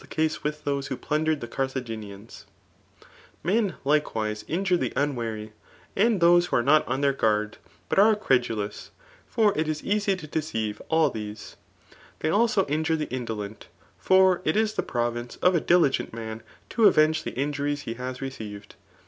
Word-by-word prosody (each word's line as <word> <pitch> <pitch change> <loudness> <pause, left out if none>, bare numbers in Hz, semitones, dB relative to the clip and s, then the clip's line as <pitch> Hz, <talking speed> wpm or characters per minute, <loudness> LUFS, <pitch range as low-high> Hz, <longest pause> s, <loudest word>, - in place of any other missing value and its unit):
case 155 0 0
wd^h 150 0 -4
tiwise 140 -1 -2
who 130 - -4
plundered 155 0 0
the 120 - -5
Carttoj^isiianfe, 115 -5 -5 1.0
Men 200 +1 +1
Uktfvdte 110 -8 0
inpmi 180 - 0
the 125 - -2
unwary, 115 -6 -2 0.4
andtboae 175 -5 +4
ik4)o - - -9
are 120 - +3
not 150 +3 +4
on 135 - -1
their 140 -1 +3
guards 105 -4 0 0.3
but - - +1
aae 215 +2 +6
eredtdous} 115 - -1 0.4
for 215 -4 +2
it 155 +1 0
is 155 -1 -3
easy 205 -1 +1
to 180 -4 -9
deceive 115 -9 -3
all 160 -4 +3
these^ 105 -1 -7 0.6
Tley 155 - 0
ilso 210 -3 +2
injure 160 +2 0
tb« 155 - -4
indokut; 110 -4 -5 0.3
for 190 -1 +4
it 155 +4 +1
is 220 -1 +2
the - - 0
province 120 0 -3
Of 180 0 +3
n 165 - +2
di%ent 170 -6 +3
mta 110 -1 -6 0.3
Co 230 - +3
avenge 155 -2 +3
the - - -7
injuries 145 +1 -1
he 115 - -5
has 125 +2 -6
received. 105 -6 -7
145 Hz, 160 wpm, -26 LUFS, 115-170 Hz, 1.0 s, aae